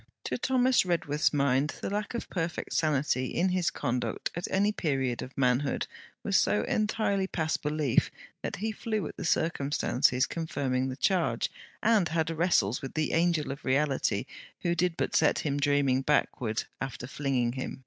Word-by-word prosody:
To -, -, -2 dB
Thomas 255 Hz, 0 st, +3 dB
Redworth's 160 Hz, -4 st, +1 dB
mind 140 Hz, +1 st, +1 dB
the -, -, -4 dB
lack 210 Hz, +3 st, -2 dB
of 235 Hz, -, -4 dB
perfect 170 Hz, -2 st, -3 dB
sanity 140 Hz, -4 st, +1 dB
in 180 Hz, +7 st, +1 dB
his 180 Hz, -2 st, +1 dB
conduct 125 Hz, +1 st, -2 dB
at 175 Hz, -, -3 dB
any 200 Hz, +2 st, +2 dB
period 135 Hz, -, -1 dB
of 130 Hz, -, -9 dB
manhood, 130 Hz, +1 st, +1 dB, 0.4 s
was -, -, +2 dB
so 105 Hz, -, +2 dB
entirely 210 Hz, -3 st, 0 dB
past 160 Hz, -4 st, -1 dB
belief 150 Hz, -4 st, +1 dB, 0.3 s
that -, -, -3 dB
he 220 Hz, +3 st, -2 dB
flew 215 Hz, -4 st, -2 dB
at -, -, -7 dB
the -, -, -5 dB
circumstances 140 Hz, -5 st, +2 dB
confirming 135 Hz, -5 st, -2 dB
the 130 Hz, -, -4 dB
charge, 155 Hz, -, +1 dB, 0.3 s
and 215 Hz, -5 st, +4 dB
had 160 Hz, 0 st, 0 dB
wrestles 160 Hz, -, +2 dB
with 135 Hz, -, -7 dB
the 155 Hz, -1 st, 0 dB
angel 165 Hz, -3 st, +2 dB
of 140 Hz, +2 st, -7 dB
reality, 135 Hz, +1 st, +1 dB, 0.4 s
who 170 Hz, -, +2 dB
did 175 Hz, -1 st, 0 dB
but -, -, -1 dB
set 155 Hz, -, +4 dB
him 145 Hz, -1 st, 0 dB
dreaming 140 Hz, -2 st, +2 dB
backward, 130 Hz, -5 st, 0 dB, 0.2 s
after 130 Hz, -2 st, -4 dB
flinging 130 Hz, -3 st, 0 dB
him. 130 Hz, +1 st, -5 dB
150 Hz, 165 wpm, -29 LUFS, 135-175 Hz, 0.4 s, and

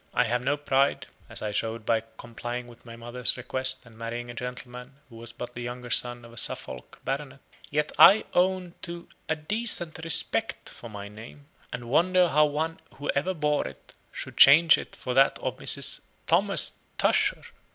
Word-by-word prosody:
I -, -, +4 dB
have 125 Hz, +2 st, -1 dB
no 140 Hz, +3 st, 0 dB
pride 140 Hz, -1 st, +1 dB, 0.2 s
(as -, -, -6 dB
I 105 Hz, -, -2 dB
showed 110 Hz, +1 st, -3 dB
by 115 Hz, -1 st, +2 dB, 0.2 s
complying 120 Hz, +1 st, -6 dB
with 120 Hz, 0 st, -17 dB
my 115 Hz, -, -9 dB
mother's 120 Hz, +2 st, -1 dB
request, 130 Hz, 0 st, -2 dB
and 115 Hz, -2 st, -17 dB
marrying 120 Hz, +1 st, -6 dB
a -, -, -9 dB
gentleman 125 Hz, +1 st, -8 dB, 0.2 s
who 115 Hz, -, -12 dB
was 115 Hz, 0 st, -7 dB
but 120 Hz, +1 st, -8 dB
the 120 Hz, -, -7 dB
younger 120 Hz, 0 st, -7 dB
son 120 Hz, -1 st, +1 dB
of 115 Hz, -, -14 dB
a -, -, -15 dB
Suffolk 65 Hz, -10 st, -4 dB
Baronet), 140 Hz, 0 st, -4 dB, 0.3 s
yet 150 Hz, +1 st, -1 dB
I 210 Hz, +3 st, +8 dB
own 180 Hz, -1 st, +1 dB
to 170 Hz, -1 st, -5 dB, 0.2 s
A 155 Hz, -, +1 dB
DECENT 175 Hz, 0 st, +1 dB
RESPECT 165 Hz, -, 0 dB
for 120 Hz, -, -11 dB
my 100 Hz, -1 st, -8 dB
name, 115 Hz, +7 st, -13 dB, 0.3 s
and 120 Hz, -, -6 dB
wonder 180 Hz, +6 st, +3 dB
how 150 Hz, 0 st, +4 dB
one 155 Hz, +2 st, -3 dB, 0.2 s
who 145 Hz, -, -3 dB
ever 185 Hz, +7 st, -1 dB
bore 150 Hz, -, 0 dB
it, 65 Hz, 0 st, -13 dB, 0.2 s
should -, -, -8 dB
change 160 Hz, +4 st, +8 dB
it -, -, -9 dB
for 125 Hz, -, -5 dB
that 135 Hz, +2 st, +4 dB
of -, -, -4 dB
Mrs. -, -, +3 dB, 0.3 s
THOMAS -, -, +3 dB, 0.2 s
TUSHER. -, -, +2 dB
125 Hz, 185 wpm, -26 LUFS, 120-150 Hz, 0.3 s, I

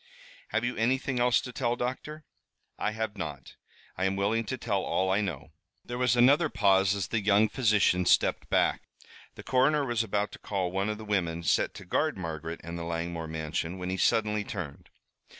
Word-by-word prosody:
Have -, -, -1 dB
you 120 Hz, -, -2 dB
anything 130 Hz, +2 st, 0 dB
else 125 Hz, 0 st, +4 dB
to 125 Hz, -, -7 dB
tell, 120 Hz, -2 st, 0 dB
doctor?" 135 Hz, +5 st, -5 dB, 0.5 s
"I -, -, 0 dB
have 110 Hz, -1 st, -3 dB
not. 75 Hz, -2 st, -6 dB, 0.4 s
I 95 Hz, -, -1 dB
am 95 Hz, 0 st, +1 dB
willing 105 Hz, +4 st, 0 dB
to 130 Hz, +5 st, -3 dB
tell 105 Hz, -5 st, -1 dB
all 95 Hz, 0 st, 0 dB
I 100 Hz, +2 st, +2 dB
know." 80 Hz, -6 st, -5 dB, 0.3 s
There 120 Hz, 0 st, -5 dB
was 125 Hz, -1 st, +3 dB
another 140 Hz, +6 st, +5 dB
pause, 95 Hz, -3 st, +3 dB
as 100 Hz, -3 st, -3 dB
the 115 Hz, -, 0 dB
young 105 Hz, +1 st, +4 dB
physician 105 Hz, -7 st, +2 dB
stepped -, -, +2 dB
back. -, -, +2 dB, 0.5 s
The -, -, -10 dB
coroner 140 Hz, +3 st, +2 dB
was 120 Hz, -3 st, 0 dB
about 105 Hz, -1 st, -1 dB
to -, -, -11 dB
call 95 Hz, -3 st, -2 dB
one 95 Hz, +2 st, -1 dB
of 105 Hz, -, -2 dB
the 110 Hz, -, -9 dB
women 85 Hz, -5 st, -1 dB
set 75 Hz, -, +1 dB
to -, -, -10 dB
guard -, -, 0 dB
Margaret 80 Hz, -2 st, -5 dB
and 85 Hz, 0 st, -6 dB
the -, -, -4 dB
Langmore 85 Hz, 0 st, -3 dB
mansion, 80 Hz, +2 st, -3 dB
when 90 Hz, 0 st, -4 dB
he 95 Hz, -, -2 dB
suddenly 105 Hz, +1 st, +2 dB
turned. 85 Hz, -9 st, -7 dB
105 Hz, 195 wpm, -29 LUFS, 90-120 Hz, 0.5 s, another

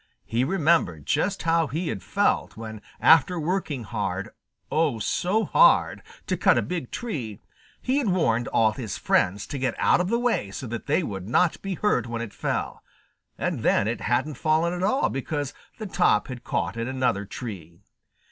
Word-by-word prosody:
He 115 Hz, +3 st, 0 dB
remembered 160 Hz, -, +1 dB
just 185 Hz, +7 st, 0 dB
how 165 Hz, -1 st, +2 dB
he 160 Hz, +5 st, -3 dB
had 95 Hz, -, -4 dB
felt -, -, 0 dB
when 110 Hz, -1 st, -7 dB, 0.2 s
after 165 Hz, +3 st, +5 dB
working 155 Hz, -6 st, -2 dB
hard, 100 Hz, -3 st, -3 dB, 0.4 s
oh, 155 Hz, -7 st, +1 dB
so 185 Hz, -, 0 dB
hard, -, -, +4 dB, 0.2 s
to -, -, 0 dB
cut -, -, +4 dB
a -, -, +2 dB
big 170 Hz, -8 st, -4 dB
tree, 130 Hz, -, -5 dB, 0.4 s
he 260 Hz, +3 st, +1 dB
had 265 Hz, -, -1 dB
warned 125 Hz, -, +1 dB
all 110 Hz, -1 st, +3 dB
his 110 Hz, -3 st, -5 dB
friends 100 Hz, +3 st, +1 dB
to 140 Hz, -, -5 dB
get 125 Hz, -2 st, -1 dB
out -, -, +3 dB
of 180 Hz, -, -2 dB
the 235 Hz, -, +2 dB
way 240 Hz, -, 0 dB
so 100 Hz, -, -6 dB
that 115 Hz, +2 st, -6 dB
they 155 Hz, +5 st, +2 dB
would 95 Hz, -, -5 dB
not 170 Hz, +7 st, +2 dB
be 195 Hz, -1 st, -3 dB
hurt 155 Hz, -, +1 dB
when 115 Hz, 0 st, -3 dB
it 110 Hz, -, -8 dB
fell, -, -, -3 dB, 0.6 s
and -, -, -2 dB
then 100 Hz, -, +2 dB
it 115 Hz, -1 st, -2 dB
hadn't 130 Hz, +3 st, 0 dB
fallen 160 Hz, +2 st, +2 dB
at 180 Hz, -, -4 dB
all 260 Hz, +9 st, +2 dB
because 145 Hz, +1 st, -3 dB, 0.2 s
the 220 Hz, -, -6 dB
top 105 Hz, -, +2 dB
had 125 Hz, -2 st, -7 dB
caught -, -, -2 dB
in 115 Hz, +1 st, -2 dB
another 130 Hz, -6 st, 0 dB
tree. 95 Hz, -5 st, -8 dB
130 Hz, 185 wpm, -25 LUFS, 110-175 Hz, 0.6 s, after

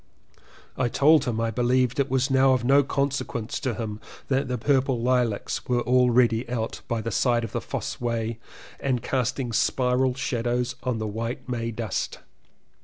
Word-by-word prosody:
I 125 Hz, -, +2 dB
told 145 Hz, +3 st, +4 dB
him 120 Hz, -3 st, -1 dB
that 115 Hz, -, 0 dB
I 115 Hz, -, 0 dB
beUeved 125 Hz, +2 st, +1 dB
it 140 Hz, 0 st, +1 dB
was 130 Hz, +1 st, +1 dB
now 130 Hz, 0 st, +5 dB
of 125 Hz, -2 st, 0 dB
no 140 Hz, +3 st, +5 dB
conse 140 Hz, 0 st, 0 dB
quence 115 Hz, -2 st, -4 dB
to 130 Hz, -5 st, -2 dB
him 110 Hz, -2 st, -5 dB, 0.3 s
that 135 Hz, 0 st, +1 dB
the 125 Hz, 0 st, -2 dB
purple 130 Hz, 0 st, +1 dB
lilacs 120 Hz, -3 st, 0 dB
were 120 Hz, -1 st, +1 dB
already 125 Hz, -2 st, +3 dB
out 115 Hz, -2 st, -3 dB
by 115 Hz, -1 st, -1 dB
the 115 Hz, +1 st, -4 dB
side 120 Hz, +1 st, +2 dB
of 115 Hz, -, -5 dB
the -, -, -2 dB
Fosse -, -, -5 dB
Way 115 Hz, -1 st, -2 dB, 0.4 s
and 130 Hz, -4 st, -1 dB
casting 125 Hz, -1 st, -1 dB
spiral 125 Hz, +1 st, +2 dB
shadows 120 Hz, -1 st, -1 dB
on 125 Hz, -3 st, -1 dB
the 110 Hz, -, -3 dB
white 115 Hz, +5 st, -4 dB
May 115 Hz, -2 st, -2 dB
dust. 110 Hz, -3 st, -3 dB
125 Hz, 180 wpm, -25 LUFS, 115-130 Hz, 0.4 s, now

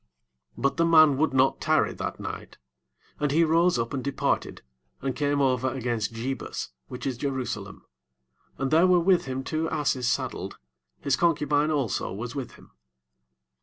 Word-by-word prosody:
10 -, -, -32 dB
¶ -, -, -9 dB
But 140 Hz, -, +1 dB
the 165 Hz, -, +3 dB
man 155 Hz, -3 st, +7 dB
would 155 Hz, +1 st, +2 dB
not 130 Hz, 0 st, +2 dB
tarry -, -, +2 dB
that -, -, -5 dB
night, -, -, -7 dB, 0.6 s
but 150 Hz, -, +1 dB
he 160 Hz, +4 st, +3 dB
rose 165 Hz, +1 st, +3 dB
up 115 Hz, +3 st, -2 dB
and 130 Hz, -2 st, -3 dB
departed, 140 Hz, -, -1 dB, 0.4 s
and 135 Hz, -1 st, -3 dB
came 145 Hz, -1 st, 0 dB
over 130 Hz, -1 st, +1 dB
against 120 Hz, -4 st, -2 dB
Jebus, 125 Hz, +4 st, -4 dB, 0.2 s
which 125 Hz, 0 st, -7 dB
is 130 Hz, -3 st, -2 dB
Jerusalem; 125 Hz, -7 st, -4 dB, 0.7 s
and 135 Hz, 0 st, -2 dB
there 165 Hz, +4 st, +5 dB
were 180 Hz, -1 st, +5 dB
with 175 Hz, 0 st, +3 dB
him 130 Hz, 0 st, -4 dB
two 160 Hz, +3 st, -2 dB
asses 135 Hz, -5 st, 0 dB
saddled, -, -, -2 dB, 0.4 s
his 140 Hz, -2 st, +1 dB
concubine 150 Hz, -2 st, +2 dB
also 140 Hz, -9 st, -1 dB
was 115 Hz, +5 st, -5 dB
with 135 Hz, -4 st, -5 dB
him. -, -, -18 dB
140 Hz, 165 wpm, -26 LUFS, 130-155 Hz, 0.7 s, man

